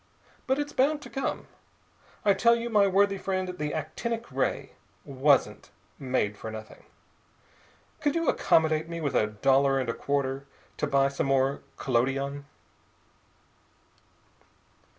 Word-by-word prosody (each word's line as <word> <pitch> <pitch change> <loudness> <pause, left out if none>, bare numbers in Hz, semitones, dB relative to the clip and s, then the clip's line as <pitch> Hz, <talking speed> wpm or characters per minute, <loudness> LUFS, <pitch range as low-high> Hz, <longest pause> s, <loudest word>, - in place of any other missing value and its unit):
But 265 - +2
it's 290 0 -3
bound 290 +3 +1
to - - -11
come. 270 - -3 0.8
I 200 - +6
tell 235 +4 +4
you, 235 0 -4
my 205 -2 +5
worthy 195 +1 +2
friend, 185 -1 -2
the 150 0 -2
actinic 225 +10 -4
ray - - -1 0.3
wasn't 140 0 +1 0.3
made 125 -6 -1
for 110 - -7
nothing. 110 0 -10 1.1
Could 290 0 0
you 335 -2 0
accommodate 160 0 +2
me 170 0 -5
with 145 -4 -2
a 105 - +3
dollar 135 +6 +2
and 130 -3 -2
a - - 0
quarter 140 0 -2 0.3
to - - -1
buy 135 0 +3
some 140 0 -2
more 135 0 +1 0.2
collodion?" 135 +3 -1
145 Hz, 130 wpm, -27 LUFS, 135-200 Hz, 1.1 s, I